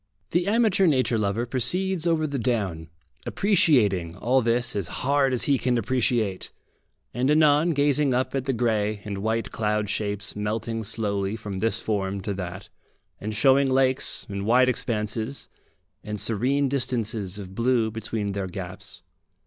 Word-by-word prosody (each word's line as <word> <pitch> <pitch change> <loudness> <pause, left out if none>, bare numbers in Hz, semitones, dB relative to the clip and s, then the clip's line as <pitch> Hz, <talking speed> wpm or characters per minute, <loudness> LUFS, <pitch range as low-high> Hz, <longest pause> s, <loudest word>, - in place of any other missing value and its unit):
The 175 +2 +1
amateur 210 -3 +3
nature 130 -6 +2
lover 105 +3 0
proceeds 170 +9 0
over 160 -2 +2
the 140 -3 -3
down, 100 -10 -2 0.4
appreciating 110 - +2
all 125 +7 +2
this 120 0 +1
as 100 -5 -2
hard 140 0 +1
as 125 - +2
he 140 -3 +2
can 125 +1 +1
appreciate, 115 -4 0 0.6
and 125 +2 0
anon 150 +1 +4
gazing 145 -1 +2
up 130 +1 0
at 135 -2 -2
the 135 - +1
grey 110 -3 0
and 100 -2 -4
white 110 +2 -1
cloud 105 -1 -1
shapes 100 -1 -3
melting 110 +2 -3
slowly 100 -2 -1
from 105 -4 -6
this 115 +1 0
form 100 -3 -2
to 100 0 -3
that, 95 0 -6 0.5
and 110 +1 -5
showing 135 +3 +4
lakes, 130 0 +1
and 100 0 -4
wide 125 +2 +5
expanses, 110 +1 -2 0.5
and 105 0 -4
serene 130 +7 +1
distances 115 -7 -2
of 95 -2 -8
blue 115 0 +1
between 110 -2 -3
their 100 -1 -3
gaps. 90 - -8
115 Hz, 150 wpm, -25 LUFS, 105-135 Hz, 0.6 s, wide